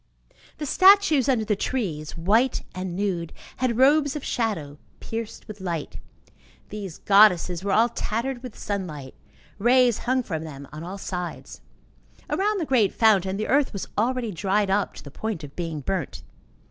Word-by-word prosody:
The 300 - -4
statues 370 - +5
under 235 -5 +2
the 210 -1 +1
trees, 175 - -3
white 220 +10 +2
and 185 -1 -5
nude, 180 -4 -2 0.3
had 250 -3 0
robes 285 +2 +4
of 295 - -5
shadow 160 -12 -2 0.2
pierced 225 -1 -6
with 210 -2 -9
light; 170 -5 -4 0.7
these 200 -5 -7
goddesses 185 -4 +4
were 200 - -1
all 225 +4 +5
tattered 235 +2 -3
with 250 -3 -9
sunlight; 160 -10 -5 0.5
rays 245 +1 +4
hung 255 +1 0
from 160 -7 -4
them 140 -3 -9
on 155 +2 -7
all 185 +3 -6
sides. 180 -2 -6 0.7
Around 415 +1 +1
the 330 - -1
great 240 -8 +3
fountain, 195 -4 +3
the 215 - -2
earth 280 -1 +2
was 200 - -5
already 240 +1 0
dried 195 +2 0
up 200 0 0
to - - -10
the 140 - -11
point 215 0 -4
of 145 -1 -10
being 165 -4 -4
burnt. 170 +1 -3
205 Hz, 160 wpm, -25 LUFS, 175-250 Hz, 0.7 s, statues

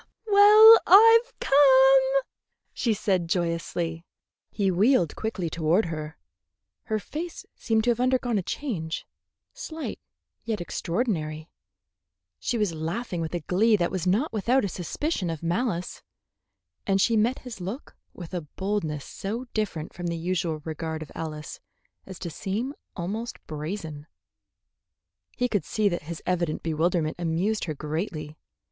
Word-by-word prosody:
"Well, 425 +2 +9
I've 455 +5 +7
come," 270 -1 +5 0.5
she 235 - 0
said 190 -5 0
joyously. 170 -1 -2 0.5
He 195 -2 0
wheeled 190 - +3
quickly 215 -6 -3
toward 165 +5 +1
her. 155 -1 -6 0.7
Her 220 - -1
face 315 +11 -6
seemed 220 -1 0
to 240 - +3
have 235 - -2
undergone 250 -3 +1
a - - -1
change, 175 - -4 0.5
slight 325 -10 -6 0.4
yet 225 -3 -2
extraordinary. 165 -4 -3 0.9
She 240 - -1
was 210 -6 0
laughing 170 +4 -3
with 165 +1 -3
a 175 - -2
glee 215 +8 +3
that 175 -4 0
was 185 -2 -2
not 225 - +1
without 230 +3 +2
a - - -2
suspicion 185 - -3
of 165 -1 -5
malice, 175 +1 -2 0.9
and 195 -1 +2
she 230 +4 +3
met 230 +4 +2
his 230 -6 -8
look 200 +10 -6 0.2
with 175 -1 -10
a 175 - -2
boldness 160 -2 -3
so 225 +6 -5
different 175 -8 -3
from 175 0 -5
the 170 0 -2
usual 165 -2 -2
regard 160 0 -4
of 150 - -14
Alice 155 -2 -6 0.5
as 190 -2 -8
to 175 -3 -6
seem 215 - -3 0.2
almost 210 +6 -4
brazen. 155 -1 -6 1.3
He 250 - +1
could 205 -8 -1
see 215 +6 0
that 175 - -3
his 170 - -6
evident 170 -3 -1
bewilderment 160 0 0
amused 175 +6 0
her 155 -3 -4
greatly. 155 0 -4
185 Hz, 140 wpm, -26 LUFS, 165-235 Hz, 1.3 s, Well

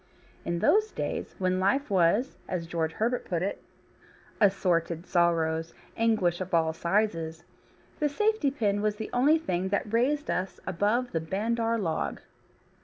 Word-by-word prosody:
In 170 0 -1
those 425 - +3
days - - -4
when 185 0 0
life 220 +7 +1
was 195 +8 +2
(as 180 -3 -3
George 165 -1 -2
Herbert 235 +6 0
puts 175 -1 -2
it) 200 - -4 0.8
"assorted 175 -4 +2
sorrows, 165 -2 +1 0.2
anguish 210 -6 +1
of 185 -1 -1
all 160 -1 +2
sizes," 170 -3 -1 0.6
the 295 - +2
safety 420 -1 +1
pin 210 -7 0
was 210 0 0
the 220 0 -6
only 280 +6 +4
thing 185 - -2
that 205 +2 -2
raised 285 +6 +1
us 185 +1 -3
above 210 +7 0
the 165 - -1
bandar 225 +7 0
log. 165 -7 -2
195 Hz, 145 wpm, -28 LUFS, 170-230 Hz, 0.8 s, only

